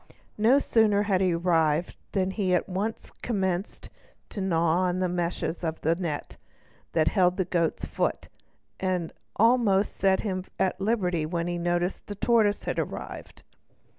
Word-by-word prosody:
No 230 +6 +5
sooner 215 -6 +3
had 195 -3 +1
he 180 -3 +2
arrived 165 -2 +1 0.2
than 190 -1 +1
he 190 -3 +1
at - - 0
once 200 +4 -3
commenced 190 -4 -2 0.4
to 200 - -5
gnaw 175 0 +2
the 185 +1 0
meshes 175 -1 -2
of 160 -1 -2
the 160 - +2
net 165 -5 -4 0.6
that 155 -2 +3
held 180 -3 +2
the 185 - +1
goat's 170 -2 0
foot - - -2 0.5
and 185 -3 -1
had - - -31 0.2
almost 220 -4 +3
set 190 -1 +2
him 185 -3 -3
at 190 0 0
liberty 180 -7 0
when 170 0 -2
the 175 +3 -2
tortoise 215 -3 +2
arrived. - - -5
185 Hz, 140 wpm, -27 LUFS, 175-200 Hz, 0.6 s, No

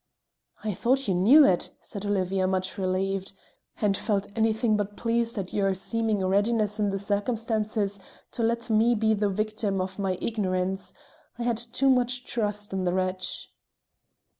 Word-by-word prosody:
"I 215 -1 -1
thought 260 +7 +1
you 190 - +2
knew 240 - +7
it," 180 -7 +2
said 205 0 -7
Olivia, 190 -1 +1
much 185 0 -1
relieved, 195 0 -1 0.5
"and 205 -2 +2
felt 205 -1 -1
anything 220 0 +2
but 205 0 -3
pleased 230 0 0
at 190 -2 -4
your 195 -2 +1
seeming 220 0 -1
readiness 210 +2 +1
in 205 -1 +2
the 195 - -1
circumstances 210 0 -1 0.3
to 240 - -4
let 230 +1 0
me 225 +2 +4
be 220 0 +2
the 205 -1 +1
victim 215 0 -1
of 185 +1 -4
my 190 -2 0
ignorance. 190 -3 -2 0.5
I 240 - -3
had 235 -2 0
too 240 +3 +2
much 250 0 +1
trust 210 -3 -2
in 190 -1 -1
the 175 -1 +1
wretch." 185 0 -2
205 Hz, 160 wpm, -27 LUFS, 190-230 Hz, 0.5 s, knew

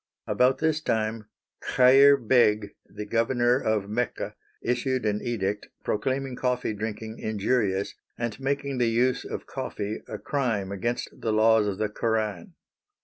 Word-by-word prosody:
About 130 +1 +3
this 155 +1 0
time 110 -4 -1 0.5
Chair 135 +2 +7
Beg, 110 -4 +3 0.2
the 105 - -7
governor 120 +2 +2
of 110 -4 0
Mecca, 115 +4 -2 0.3
issued 125 +1 0
an 105 0 0
edict 105 -4 -2
proclaiming 130 +4 -1
coffee 125 -2 -1
drinking 110 +1 -5
injurious 105 -2 0 0.2
and 120 0 -3
making 140 0 -2
the 120 -1 +3
use 125 +3 +1
of - - -6
coffee 105 +1 -4
a 105 - -5
crime 105 -4 -1
against 120 +5 -2
the 110 - 0
laws 110 0 +4
of 100 -2 -2
the 110 - 0
Koran. 105 -3 -2
115 Hz, 140 wpm, -26 LUFS, 105-125 Hz, 0.5 s, Chair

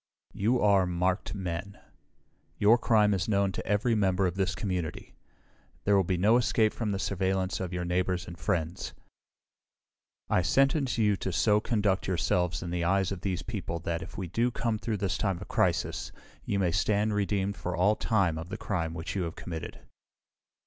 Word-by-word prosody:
You 115 +5 +1
are 100 -3 +4
marked 90 +3 -1
men. 95 +1 -4 0.8
Your 110 +4 +5
crime 105 -3 +4
is 95 - -1
known 100 -2 +2
to - - -6
every 105 +4 +2
member 95 -3 +2
of 90 - 0
this 95 0 -1
community. 90 -6 -4 0.7
There 100 - +3
will 95 - +4
be 90 0 -1
no 105 +6 +4
escape 110 -3 +2
from 110 -3 -2
the 100 - -1
surveillance 95 -1 -1
of 90 -2 -3
your 90 -1 -3
neighbors 90 +1 0
and 85 - -8
friends. 80 +2 -2 1.3
I - - +2
sentence 135 - +2
you 105 -3 +3
to 95 - -3
so 105 +3 +3
conduct 105 -4 0
yourselves 90 -1 0
in 85 - -5
the 85 -1 -1
eyes 95 +2 +2
of 95 -3 -5
these 95 -3 -2
people 100 -6 -4
that, 85 0 -2
if - - -9
we 95 - -3
do 115 +8 +1
come 115 -2 -2
through 110 -1 -2
this 100 0 -1
time 95 -4 0
of - - -9
crisis, - - 0 0.3
you 100 - -1
may 90 -3 +1
stand 105 +4 +1
redeemed 100 -1 0
for 90 -2 -4
all 100 +5 +3
time 95 -8 +1
of 85 +2 -7
the 110 - -4
crime 85 -7 -2
which 80 +3 -5
you 95 - 0
have 85 -1 -3
committed. 80 -3 -7
95 Hz, 185 wpm, -29 LUFS, 90-105 Hz, 1.3 s, Your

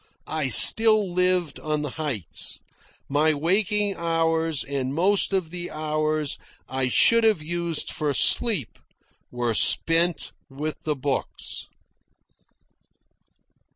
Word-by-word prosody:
I 155 -3 -3
still 215 - +6
lived 180 -2 0
on 150 -1 -3
the 145 - -5
heights. 140 - -4 0.5
My 150 +2 +1
waking 200 +5 0
hours, 165 -2 0
and 135 -1 -4
most 195 +5 +1
of 185 -5 -2
the 175 0 -5
hours 155 -1 -2 0.3
I 130 -1 -2
should 230 - +3
have 215 -8 +1
used 170 0 -4
for 150 -1 -2
sleep, 205 - +2 0.5
were 120 -1 -2
spent 165 +8 +2 0.2
with 150 +3 -7
the 150 -1 -1
books. 135 0 -4
160 Hz, 110 wpm, -23 LUFS, 145-180 Hz, 0.5 s, still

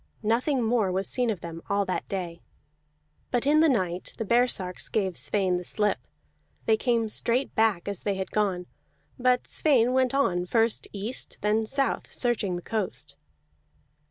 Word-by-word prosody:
Nothing 245 +4 +1
more 220 -4 +1
was 190 +1 -1
seen 245 -2 +1
of 205 -6 -2
them 165 -1 -7
all 200 0 +1
that 185 - -3
day. 175 -3 -4 0.9
But 245 +1 0
in 300 +2 +4
the 320 0 +5
night 185 -8 -1
the 225 - -3
baresarks 220 -6 +1
gave 190 -5 0
Sweyn 190 -2 +1
the 180 - -5
slip; 210 +3 0 0.7
they 220 - +4
came 230 0 +1
straight 240 +4 +1
back 220 -6 +2
as 200 -3 -3
they 200 -1 -1
had 190 0 -4
gone, 190 -4 0 0.5
but 250 0 +2
Sweyn 255 -5 +3
went 260 0 +2
on, 180 -10 +1
first 225 +2 +2
east, 210 +5 -4
then 215 +1 +1
south, 275 +3 -1
searching 215 -7 0
the 175 - -6
coast. 150 - -4
215 Hz, 160 wpm, -27 LUFS, 185-245 Hz, 0.9 s, the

